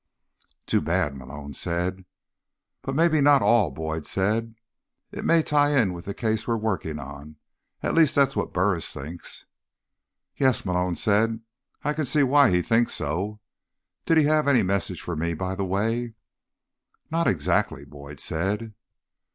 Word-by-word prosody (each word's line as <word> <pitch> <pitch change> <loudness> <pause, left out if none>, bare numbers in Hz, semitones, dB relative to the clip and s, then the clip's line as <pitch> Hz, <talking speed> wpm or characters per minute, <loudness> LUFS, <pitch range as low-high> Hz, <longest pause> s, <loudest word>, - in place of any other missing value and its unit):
"Too - - +1
bad," 70 -1 0
Malone 70 +2 -9
said. 90 +5 -3 0.8
"But 135 - -4
maybe 160 -1 +3
not 140 -1 +5
all," 115 -8 +4
Boyd 80 +2 -5
said. 110 +4 -1 0.6
"It - - -6
may 165 -1 +4
tie 145 -1 +3
in 100 -7 +1
with 85 -1 -9
the 100 - -5
case 110 -1 -1
we're 115 -1 +1
working 95 -8 -2
on. 75 +1 -9 0.5
At - - 0
least, 160 -3 +4
that's 140 -1 +3
what - - -2
Burris 90 -2 0
thinks." 80 +5 -8 0.9
"Yes," 130 -6 +2
Malone 90 -1 0
said. 110 +4 +1 0.4
"I 150 - 0
can 155 0 -2
see 140 +3 +2
why 140 +1 +5
he 90 -1 +2
thinks 115 +4 +2
so. 95 +8 -3 0.7
Did 165 - +4
he 155 - +6
have 150 0 +2
any 125 -6 +4
message 95 -3 -2
for 90 - -4
me, 85 +2 -2
by 95 +3 -3
the 95 0 -2
way?" 110 +5 -1 1.0
"Not 165 +1 +1
exactly," 70 -4 0
Boyd 70 0 -11
said. 105 +7 -2
100 Hz, 155 wpm, -25 LUFS, 85-130 Hz, 1.0 s, he